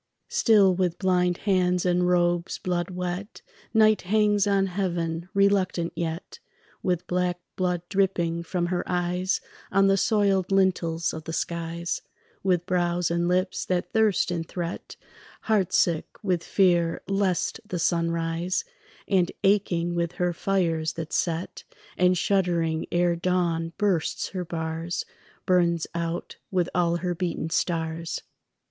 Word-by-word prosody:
Still 220 - +5
with 180 -2 0
blind 180 -2 +2
hands 180 -3 +2
and 180 0 +2
robes 175 0 +1
blood 175 -1 -2
wet 180 +3 -5 0.3
Night 215 -1 +4
hangs 205 +1 +2
on 195 -1 +3
heaven, 175 -3 -2
reluctant 195 -4 +2
yet, 165 0 -4 0.4
With 180 -2 -1
black 180 0 0 0.2
blood 180 -2 -1
dripping 180 -4 0
from 175 +1 -2
her 175 - 0
eyes 180 +1 0 0.3
On 195 +1 +4
the 195 0 +4
soiled 195 -3 +2
lintels 175 -4 +1
of 160 -1 -7
the 165 - -5
skies, 170 +1 -3 0.4
With 180 -2 +1
brows 175 -1 0
and 170 0 +1
lips 185 +1 0
that 180 -1 -2
thirst 220 -5 +3
and 165 -2 -3
threat, 175 0 -5 0.5
Heart 210 -5 +1
sick 165 -3 +2 0.2
with 180 -4 0
fear 175 -4 +2
lest 195 -2 0
the 210 -4 -4
sun 170 0 +1
rise, 165 - -1 0.4
And 185 -3 +2
aching 180 -4 +2
with 170 0 -1
her 180 -1 0
fires 165 -4 0
that 160 -1 -6
set, 170 +1 -2 0.3
And 180 0 +3
shuddering 170 -4 +1
ere 175 0 +2
dawn 170 -2 0
bursts 190 -7 0
her 185 -2 -4
bars, 165 +1 -3 0.4
Burns 170 -3 +2
out 170 0 -3
with 180 -2 0
all 170 -2 +2
her 175 +1 -1
beaten 170 -2 -3
stars. 165 -1 -1
180 Hz, 135 wpm, -26 LUFS, 170-190 Hz, 0.5 s, Still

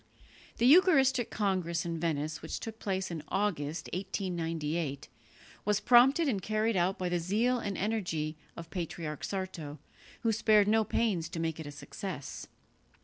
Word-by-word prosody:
The 235 - +2
eucharistic 270 - +5
congress 185 -5 -1
in 165 -1 -3
Venice 155 -2 -2
which 160 - -4
took 225 0 -7
place 190 -2 -2
in 165 -2 -4
August, 170 -6 -1
1898, 165 -6 -2 0.6
was 210 0 +2
prompted 250 +8 +5
and 210 -8 0
carried 215 +2 0
out 185 +1 +1
by 185 - -2
the 175 0 0
zeal 225 +9 +1
and 200 -3 -3
energy 180 -7 -1 0.2
of 170 -1 -9
Patriarch 165 -4 -4
Sarto, 180 -6 -4 0.4
who 230 - +2
spared 215 -1 +4
no 220 +1 +4
pains 195 -6 0
to 170 - -5
make 165 -1 -2
it 160 - -6
a - - -6
success. 145 +2 -7
185 Hz, 150 wpm, -31 LUFS, 165-215 Hz, 0.6 s, eucharistic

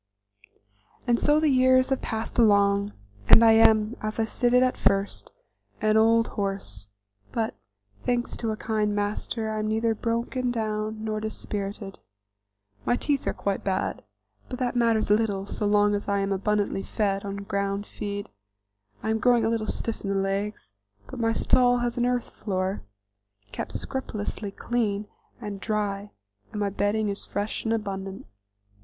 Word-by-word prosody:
And 240 -2 +2
so 295 +1 +4
the 310 - +2
years 255 -1 +4
have 270 - 0
passed 225 +2 -3
along, 200 -2 +4 0.4
and 230 - +9
I 225 - +8
am, 220 0 +5
as 215 +1 -3
I - - +3
stated 245 +2 +3
at 255 - +1
first, 195 +1 0 0.5
an 215 0 +2
old 225 +1 +4
horse, 195 - -4 0.4
but, 225 -1 -1 0.5
thanks 245 0 -1
to 230 - -2
a 215 - -2
kind 215 -2 0
master, 215 +2 -2
I 215 - -2
am 215 - -1
neither 225 +1 +1
broken 235 +3 -1
down 215 -2 -2
nor 215 -1 -2
dispirited. 205 -2 -4 0.8
My 245 - +2
teeth 280 +2 -1
are - - +1
quite 200 -1 -2
bad, 190 -1 -1 0.5
but 250 - -4
that 250 -1 -1
matters 230 -3 +2
little 205 -2 +2
so 205 +1 -2
long 205 0 +4
as 205 - -2
I 200 0 +1
am 195 0 0
abundantly 200 0 0
fed 195 -1 -1
on 200 0 -5
ground 200 0 -2
feed; 205 -1 -5 0.7
I 220 - 0
am 220 - +1
growing 240 -1 +4
a - - +2
little 225 -1 -1
stiff 230 - -3
in 200 - -4
the 195 - 0
legs, 195 - -2 0.3
but - - -9
my 225 -1 +2
stall 245 +1 +4
has 240 -1 -1
an 240 - +2
earth 245 -1 -1
floor, 190 -1 -2 0.7
kept - - -5
scrupulously 215 -5 -4
clean 210 -1 -1 0.3
and 200 -1 -6
dry 205 -2 -2 0.4
and 210 - -5
my 200 -1 0
bedding 205 +2 0
is 200 0 -2
fresh 205 +3 -3
and 225 - +1
abundant. 195 -3 -3
215 Hz, 160 wpm, -26 LUFS, 200-230 Hz, 0.8 s, and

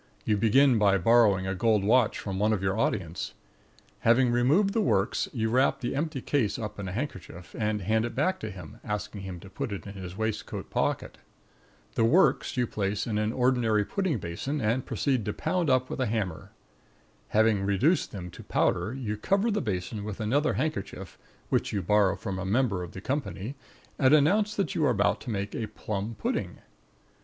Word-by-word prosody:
You 105 - +2
begin 115 +4 +4
by 100 -2 +4
borrowing 100 -1 +4
a 95 - -1
gold 105 +1 +2
watch 115 +2 +3
from 95 -2 -4
one 105 +1 +3
of 100 -3 -2
your 95 0 +1
audience. 95 -6 -2 0.6
Having 120 +2 +4
removed 145 +12 +3
the 225 - +2
works, 105 - +1
you 110 -3 -1
wrap 130 +3 +3
the 120 +2 -3
empty 150 -2 -2
case 130 -7 0
up 105 -3 -6
in 100 - -4
a - - -4
handkerchief 95 - -6
and 105 -2 -1
hand 110 +3 +2
it 120 - -4
back 155 +8 +1
to 110 - -5
him, 90 -6 -10
asking 105 -1 -4
him 95 -2 -7
to 95 - -11
put 125 +5 -5
it 100 - -5
in 100 - -7
his 95 -2 -8
waistcoat 110 -1 -4
pocket. - - -1 0.7
The 115 - +1
works 155 +3 +3
you 125 - +2
place 100 -1 -2
in 105 -3 -1
an 105 0 0
ordinary 120 -4 +2
pudding 185 - -1
basin 100 - -4
and 120 +2 0
proceed 130 -5 0
to 105 - -2
pound 170 -1 -1
up 130 -1 +3
with - - -4
a 130 - +1
hammer. 105 -7 -3 0.8
Having 110 -2 +3
reduced 130 - +2
them 90 -3 -7
to - - -11
powder, 115 - 0
you 115 -6 -3
cover 200 - +1
the 210 - 0
basin 100 0 -3
with 105 0 -6
another 140 +8 +1
handkerchief, 100 - -4 0.3
which - - +1
you 100 -2 -2
borrow 100 +1 +3
from 100 -3 -5
a - - -3
member 100 -1 +1
of 90 -2 -7
the 95 - -8
company, 110 - -3 0.5
and 130 +2 +6
announce 205 +8 +3
that 200 - -1
you 160 - 0
are 145 - +4
about 100 -5 +1
to 125 - -7
make 100 -2 -3
a 110 - -3
plum 105 +2 -4
pudding. 100 - -2
110 Hz, 195 wpm, -28 LUFS, 100-130 Hz, 0.8 s, and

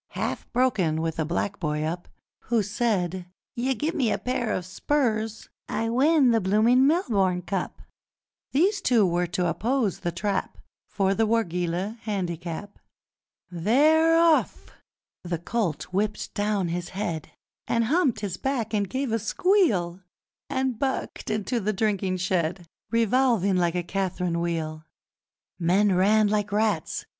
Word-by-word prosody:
Half - - -4
broken, 210 -11 +1
with 165 0 -2
a 160 - +1
black 185 +5 -2
boy 150 -3 -1
up, 170 +3 -4 0.4
Who 230 -2 +1
said, 190 -4 -1 0.3
'You 260 +2 0
gim'me 295 -3 0
pair 245 -3 -2
o' - - -1
spurs, 220 - -1 0.2
I 225 0 -1
win 270 +2 +4
the 225 -1 +2
bloomin' 225 +7 +4
Melbourne 200 - +1
Cup!' 195 0 -4 0.7
These 385 +8 +2
two 235 - +4
were 175 0 0
to 180 +1 -1
oppose 220 - 0
The 175 - -2
Trap 195 +2 -2 0.3
For 195 -1 +1
the 220 +2 +1
Wargeilah 185 -1 -1
Handicap! 180 -2 -4 0.7
They're 300 - +4
off! 335 -2 +2 0.5
The 175 -1 -2
colt 175 -1 -2
whipped 210 +2 -1
down 205 -3 0
his 175 +1 -3
head, 185 -6 -4 0.4
And 230 - +1
humped 270 -3 +1
his 190 -4 -3
back 240 -4 -2
and 200 -3 0
gave 265 +1 -2
a 225 - +1
squeal, 210 - +1 0.5
And 260 -4 -1
bucked 265 -1 -3
into 215 +3 -1
the 215 0 -1
drinking 195 -3 0
shed, 180 -1 -1 0.2
Revolving 230 -3 +2
like 175 -1 +1
a 175 - -1
Cath'rine 180 -2 -2
wheel! 160 -2 -3 0.8
Men 190 +4 +3
ran 210 +4 +4
like 205 0 0
rats! 215 +1 0
205 Hz, 135 wpm, -25 LUFS, 180-235 Hz, 0.8 s, win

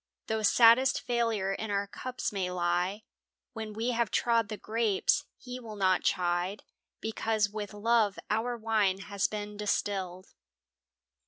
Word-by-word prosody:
Though 220 0 -1
saddest 235 +4 +6
failure 230 -5 0
in 220 +2 -4
our 200 0 0
cups 255 +5 -4
may 190 -3 -2
lie 180 +3 -1 0.5
When 220 -2 -5
we 225 +4 -1
have 235 -3 0
trod 230 +1 +2
the 215 - -4
grapes, 225 +6 +1
He 250 0 -8
will 225 -3 -9
not 185 -2 +2
chide, 180 +2 0 0.4
Because 220 -1 0
with 210 -1 -5
love 215 -1 +2
our 235 +3 -1
wine 215 -4 +1
has 200 0 -1
been 210 -1 -6
distilled. 190 -3 -2
210 Hz, 140 wpm, -30 LUFS, 195-230 Hz, 0.5 s, saddest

